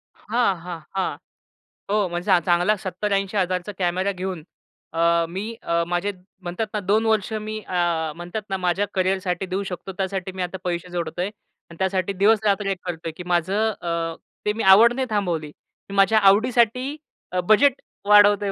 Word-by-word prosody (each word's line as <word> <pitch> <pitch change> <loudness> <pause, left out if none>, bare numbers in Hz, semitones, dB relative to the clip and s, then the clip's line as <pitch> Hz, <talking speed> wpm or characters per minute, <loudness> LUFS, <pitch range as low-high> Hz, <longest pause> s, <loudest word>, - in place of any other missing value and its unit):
हां, 225 -3 0
हां, 175 -1 -6 0.2
हां. 190 - -1 0.7
हो, 205 -2 +2
म्हणजे 175 +1 -4
चां 185 -3 +5
चांगला 175 +4 +3
₹70,000-80,000 195 -1 -1
चा 210 - -5
कॅमेरा 185 +2 +1
घेऊन 185 -3 -5 0.5
अ, 170 0 +3
मी 190 +4 -4 0.2
अ, 170 0 0
माझे 175 +4 -1 0.3
म्हणतात 180 +5 -3
ना, 210 - 0
2 210 +3 +1
वर्ष 220 -1 +1
मी 215 0 -5
अ, 170 -3 0
म्हणतात 175 +5 -5
ना 190 - -1
माझ्या 185 +2 0
करिअरसाठी 185 -1 0
देऊ 185 +2 -2
शकतो. 190 0 -6
त्यासाठी 190 -1 -2
मी 185 - -6
आता 180 +2 -4
पैसे 175 0 -3
जोडतोय. 175 +1 -2 0.4
आणि 170 - -12
त्यासाठी 190 0 0
दिवसरात्र 205 +1 +2
एक 195 - -1
करतोय, 165 -2 -4
की 180 - -6
माझं 190 +6 +1
अ, 165 -1 -2 0.3
ते 210 - +2
मी 225 - -3
आवड 235 +4 +7
नाही 260 0 -2
थांबवली. 175 -8 -1 0.4
मी 200 - -6
माझ्या 205 +3 +5
आवडीसाठी 240 +4 +3 0.4
अ, 185 - 0
बजेट 275 +5 +5 0.2
वाढवतोय 205 -1 +6
190 Hz, 165 wpm, -23 LUFS, 175-210 Hz, 0.7 s, आवड